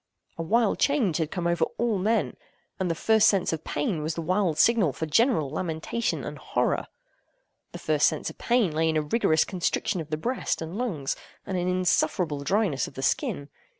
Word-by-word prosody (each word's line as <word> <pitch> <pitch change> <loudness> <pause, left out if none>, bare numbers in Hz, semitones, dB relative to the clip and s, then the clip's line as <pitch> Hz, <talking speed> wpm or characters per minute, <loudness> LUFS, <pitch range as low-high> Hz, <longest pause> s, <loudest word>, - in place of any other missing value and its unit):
A - - -5
wild 220 +6 +2
change 250 - +2
had 160 -3 -1
come 175 -1 -4
over 170 -1 +1
all 230 -4 0
men; 220 +5 0 0.4
and 185 -2 0
the 165 - 0
first 220 +4 +4
sense 195 -4 +2
of 160 -1 -4
pain 150 +2 -2
was 155 +1 -2
the 165 - -3
wild 180 -2 +1
signal 215 - +4
for 160 - -3
general 160 - +2
lamentation 165 +8 -2
and - - -6
horror. - - -1 0.8
This - - -9
first - - +4
sense - - -2
of - - -19
pain 235 -7 +2
lay 160 +1 +1
in 160 - +1
a 155 - +1
rigorous 155 -1 +2
constriction 185 0 -1
of 155 - -9
the 155 - -1
breast 245 +11 -2
and 165 +2 -6
lungs, 190 - -2 0.3
and 190 - -3
an 180 0 -1
insufferable 180 -4 +1
dryness 190 -4 +1
of - - -13
the 135 - -5
skin. 140 +1 -1
175 Hz, 195 wpm, -26 LUFS, 155-215 Hz, 0.8 s, first